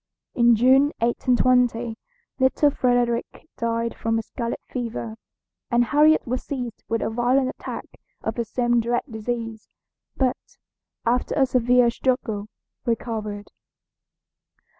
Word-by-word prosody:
In 235 -1 +5
June, 265 +5 +5
1820, 240 -1 +2 0.4
little 265 +3 +3
Frederick 245 +2 0
died 230 0 -1
from 225 0 -1
scarlet 230 +1 -4
fever, 230 -2 -4 0.5
and 240 -1 +3
Harriet 300 +4 +4
was 255 0 -2
seized 250 -5 -5
with 230 0 0
a - - -1
violent 250 +3 +2
attack - - -6 0.4
of - - -1
the 235 - -2
same 240 +1 +1
dread 240 +1 0
disease; 225 -1 -5 0.5
but, 255 -2 -2 0.5
after 245 +2 +1
a 270 - +4
severe 250 -1 +3
struggle, 230 -5 -1 0.4
recovered. 215 -4 -3
240 Hz, 115 wpm, -24 LUFS, 230-255 Hz, 0.5 s, In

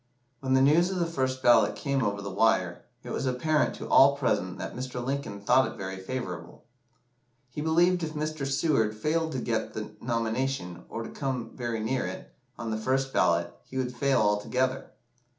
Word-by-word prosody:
When 130 -1 +1
the 130 - +5
news 165 +6 +5
of 190 - -2
the 175 - +1
first 130 -5 -2
ballot 110 -4 +5
came 140 -2 -1
over 100 -1 -1
the 100 - -5
wire, - - +1 0.2
it - - -7
was 135 - -2
apparent 150 +5 +1
to - - -7
all 140 +1 +6
present 95 -9 0
that - - -6
Mr. 125 0 -5
Lincoln 135 -6 -3
thought 130 +6 +4
it - - -12
very 95 0 -5
favourable. 95 -5 -6 0.9
He 150 - -5
believed 175 +3 +3
if 160 -1 -4
Mr. 150 -2 -2
Seward 125 -8 +1
failed 160 +6 0
to - - -2
get 115 -2 -2
the 110 - -5
nomination, 115 -6 -2
or 115 - -4
to - - -7
come 130 -4 -3
very 120 -2 -3
near 125 +4 -1
it, - - -8 0.2
on 115 -1 -4
the 110 - -1
first 135 +4 0
ballot, 85 0 +2
he 130 - -8
would 125 -1 -2
fail 140 0 +2
altogether. 125 +6 0
130 Hz, 185 wpm, -28 LUFS, 110-140 Hz, 0.9 s, all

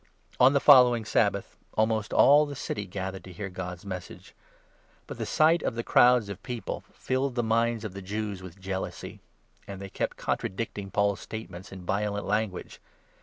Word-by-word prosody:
On 130 +2 +7
the 140 - +4
following 125 -5 +6
Sabbath, - - 0 0.2
almost 110 -1 +1
all 150 +2 +6
the 145 - -6
city 105 -6 -4
gathered 95 0 -5
to - - -10
44 90 - -13
hear 100 -2 -4
God's 90 0 -6
Message. 95 -2 -8 0.7
But - - -9
the - - -3
sight 160 +2 +4
of - - -2
the 115 - -3
crowds 120 -3 +5
of 100 -1 -7
people 120 -1 -5
45 - - -30
filled 130 0 -1
the 120 - +1
minds 115 0 +1
of 105 - -5
the 100 - -7
Jews 100 0 -4
with 95 +1 -11
jealousy, 95 0 -5 0.5
and 100 -1 -7
they 100 0 -7
kept - - -3
con - - -1
tradicting 100 0 -5
Paul's 100 -1 +1
statements 95 -4 -8
in 95 -2 -9
violent 100 +2 -1
language. 105 -2 -2
105 Hz, 185 wpm, -27 LUFS, 95-120 Hz, 0.7 s, On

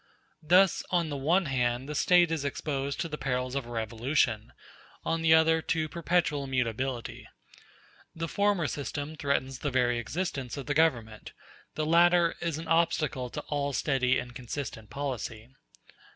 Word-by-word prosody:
Thus, 180 +4 +4
on 175 -3 +1
the 145 - -3
one 165 +7 +2
hand 125 -1 0
the 150 - -4
State 175 +2 +4
is 160 -3 -1
exposed 140 -1 -3
to 170 - -2
the 150 -1 -6
perils 125 -1 -2
of 135 -3 -3
a - - -10
revolution, 115 0 -1 0.5
on 165 0 0
the 160 0 +6
other 160 0 +4
to 160 0 -1
perpetual 170 -4 0
mutability; 125 -1 -2 0.9
the 165 0 -3
former 200 -1 +1
system 145 +1 -4
threatens 135 -3 -1
the 145 - -2
very 125 -2 +1
existence 135 - -4
of 140 - -5
the 145 - -1
Government, 120 -9 0 0.4
the 155 - -1
latter 170 +1 +4
is 165 -3 -2
an 160 +1 -7
obstacle 160 -6 +1
to - - -5
all 145 -1 -2
steady 130 -2 +1
and 120 0 -5
consistent 120 -3 -6
policy. 125 -4 -5
145 Hz, 155 wpm, -29 LUFS, 125-165 Hz, 0.9 s, the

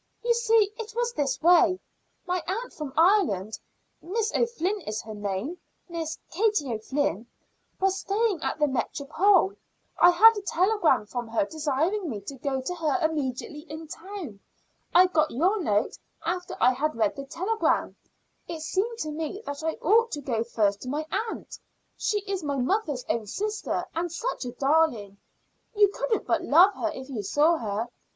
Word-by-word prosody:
"You 475 0 +3
see, 450 -3 +3
it 445 0 -7
was 475 0 0
this 275 - -1
way. 355 +1 +5 0.5
My 360 -1 -1
aunt 450 +7 -3
from 300 -4 -6
Ireland 240 - +3 0.4
(Miss 440 +6 -1
O'Flynn 425 -4 0
is 215 0 -2
her 220 - -8
name 205 - -4 0.3
Miss 330 -2 -4
Katie 375 - +1
O'Flynn) 225 - -2 0.5
was 385 0 +1
staying 405 -4 0
at - - -2
the 300 - +3
Métropole. 310 - +2 0.4
I 350 - +8
had 445 +6 +7
a 410 - -4
telegram 385 - +2
from 240 +2 -5
her 225 -2 +1
desiring 315 - -1
me 215 -5 -4
to 200 - -7
go 265 0 -2
to 310 +8 -3
her 330 0 0
immediately 295 -1 -4
in 315 +1 -7
town. 335 - -8 0.5
I 360 +2 +7
got 315 -4 +2
your 370 - +1
note 210 -9 0 0.3
after 355 +1 -3
I 255 - +5
had 305 +4 -1
read 220 -3 +1
the 275 - -6
telegram. 375 +10 0 0.5
It 330 -2 -6
seemed 410 +8 -1
to 305 - -3
me 320 +7 -5
that 285 +2 -5
I 320 0 0
ought 455 +7 +4
to 295 - -3
go 235 -5 -1
first 205 -4 0
to 255 - -6
my 300 +3 -2 0.2
aunt. - - -8 0.4
She 415 -1 -1
is 390 -2 -3
my 285 -3 -2
mother's 290 - 0
own 225 -3 -1
sister, 420 - -2
and 335 +1 -2
such 400 - -3
a 245 - -4
darling. 270 -8 +1 0.6
You 410 -1 +6
couldn't 445 +2 -1
but - - +1
love 360 +7 +6
her 330 - -2
if 260 -4 -8
you 255 -6 -4
saw 300 - +3
her. 220 -1 -3
320 Hz, 170 wpm, -26 LUFS, 260-390 Hz, 0.6 s, I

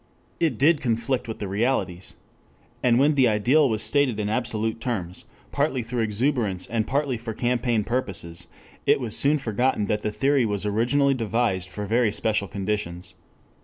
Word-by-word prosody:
It 160 -9 +1
did 150 +4 +4
conflict 120 +1 -1
with 110 - -5
the 100 - -4
realities. 95 -4 -1 0.7
And 120 -2 +3
when 145 +4 +4
the 135 -3 +4
ideal 125 +7 +3
was 110 -1 -1
stated 140 -7 +1
in 105 0 -1
absolute 115 -1 -1
terms, 95 -8 -4 0.3
partly 140 -3 0
through 115 +1 -3
exuberance 110 -3 0
and 110 -1 -2
partly 140 -1 0
for 115 -1 -6
campaign 120 -2 0
purposes, 95 -8 -4 0.4
it - - +4
was 120 -5 -3
soon 145 +2 +3
forgotten 120 -3 0
that 105 +1 -1
the 105 - -2
theory 135 +4 +2
was 105 -2 -1
originally 120 +7 +2
devised 115 -6 -1
for 105 +2 -5
very 115 +1 +2
special 105 -1 0
conditions. 95 -2 -4
115 Hz, 165 wpm, -24 LUFS, 105-130 Hz, 0.7 s, did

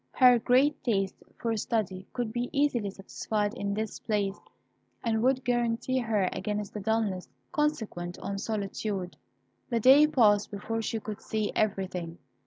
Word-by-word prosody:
Her 250 -2 +6
great 260 +6 +3
taste 195 -5 0 0.2
for 230 -1 -1
study 195 -4 -2
could 240 -3 -2
easily 255 +1 +1
be 200 - -3
satisfied 205 +2 -2
in 200 -4 -2
this 220 0 -3
place, 205 -2 -1 0.6
and 220 -1 +1
would 260 +1 +2
guarantee 240 +1 +1
her 215 -6 +1
against 210 -1 -3
the 210 - -4
dulness 210 -3 -1 0.2
consequent 220 -13 -1
on 200 0 -4
solitude. 200 -3 -3 0.5
The 235 -2 +1
day 270 +6 +7
passed 210 -8 +4
before 225 +3 -3
she 225 0 -2
could 215 0 -7
see 215 -1 -2
everything. 185 -5 -1
220 Hz, 145 wpm, -29 LUFS, 200-240 Hz, 0.6 s, day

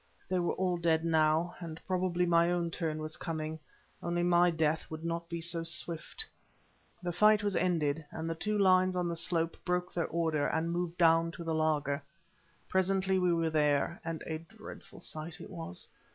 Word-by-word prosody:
They 185 0 +1
were 175 - +1
all 180 -1 0
dead 165 -1 +2
now, 160 +1 +3
and 165 -2 -7
probably 180 -1 +1
my 170 0 +4
own 170 -1 0
turn 155 -2 -2
was 155 0 -4
coming, 160 -1 -4 0.4
only 175 0 0
my 175 0 +5
death 160 -1 0
would 160 +1 -6
not 170 0 -3
be 170 -1 -4
so 170 0 -1
swift. 170 - -2 0.8
The 175 - -1
fight 210 +4 +5
was 205 -2 0
ended, 160 -4 +1
and 160 0 -5
the 165 - 0
two 210 +6 -1
lines 185 -1 +4
on 180 -1 0
the 170 - -2
slope 165 0 0
broke 180 0 -1
their 170 - 0
order, 160 -3 0
and 160 +1 0
moved 175 0 -2
down 165 -1 +5
to 170 - -7
the 165 -1 -1
laager. 150 -2 +1 0.7
Presently 190 0 +2
we 180 -1 +3
were 165 -1 +1
there, 150 +4 +2
and 165 -2 -4
a 160 -1 -3
dreadful 215 +7 -12
sight 160 +1 -3
it - - -10
was. 165 - -5
170 Hz, 185 wpm, -32 LUFS, 160-180 Hz, 0.8 s, my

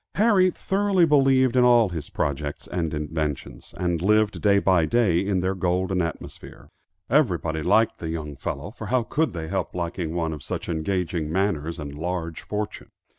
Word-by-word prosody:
Harry 200 -3 +4
thoroughly 195 0 +1
believed 135 -4 +4
in 125 - +5
all 120 -4 +5
his 80 -5 -6
projects 70 +1 -3
and 85 -3 -2
inventions, 75 -4 -4
and 90 -2 -1
lived 105 +2 +2
day 100 -1 +4
by 95 -4 +3
day 100 -2 +2
in 95 -1 0
their 95 +1 0
golden 90 0 0
atmosphere. 85 -1 -7 0.4
Everybody 90 - +1
liked 105 +7 +2
the 80 - -4
young 75 -3 -5
fellow, 70 +7 -5
for 110 -2 -8
how 125 +1 +1
could 155 +7 -1
they 80 -2 -5
help 95 0 -3
liking 85 -1 -3
one 80 -2 -1
of 75 - -8
such - - -5
engaging 85 -1 -2
manners 85 -3 -1
and 75 -3 -6
large 85 +1 -4
fortune? 105 0 -5
90 Hz, 170 wpm, -24 LUFS, 80-110 Hz, 0.4 s, in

